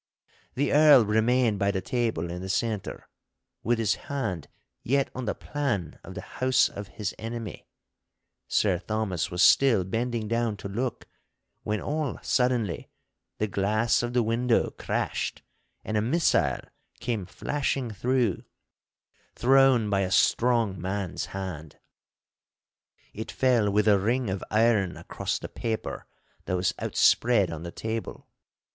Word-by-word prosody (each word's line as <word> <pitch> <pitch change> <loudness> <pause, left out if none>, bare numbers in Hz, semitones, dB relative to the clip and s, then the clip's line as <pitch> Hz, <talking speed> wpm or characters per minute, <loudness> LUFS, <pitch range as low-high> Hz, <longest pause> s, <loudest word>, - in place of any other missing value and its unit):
The 140 +2 0
Earl 145 -5 +7
remained 110 +1 +2
by 100 - +2
the 100 -1 0
table 110 -7 -2
in 90 +1 -5
the 95 - -6
centre, 110 0 -2 0.5
with 120 +1 +1
his 110 -3 +2 0.2
hand 110 - -3 0.3
yet 135 +2 +1
on 130 0 -5
the - - -1
plan 125 - -3
of - - -10
the - - -5 0.2
house 130 0 +4
of 100 0 -8
his 105 -3 -2
enemy. 115 -1 -6 0.8
Sir 95 -5 +2
Thomas 105 -4 -2
was 90 +2 +1
still 120 -9 +5
bending 115 +3 -2
down 115 -1 0
to 100 - -7
look, 120 +4 -3 0.5
when 105 0 -2
all 150 -1 -2
suddenly 125 -7 0 0.5
the 110 - 0
glass 105 +3 +1
of 120 0 -3
the 125 -1 +3
window 115 +2 +1
crashed - - -3 0.4
and 110 - -3
a 105 - +3
missile 110 - +2 0.4
came 110 -7 -3
flashing 135 +2 -2
through, 120 -1 0 0.9
thrown 130 -3 +4
by 100 -1 +1
a 95 -1 0
strong 110 -1 +2
man's 95 0 -3
hand. 90 -6 -6 1.4
It 110 +2 -6
fell 120 -5 +2
with 105 +1 +2
a 100 -2 +5
ring 115 +2 0
of 95 - -4
iron 110 -4 +2
across - - -3
the - - -7
paper 110 -1 -4 0.4
that 90 - -1
was 90 0 +1
outspread 110 -7 +3
on 80 -1 -6
the 85 0 -6
table. 110 +4 -5
110 Hz, 140 wpm, -27 LUFS, 100-125 Hz, 1.4 s, Earl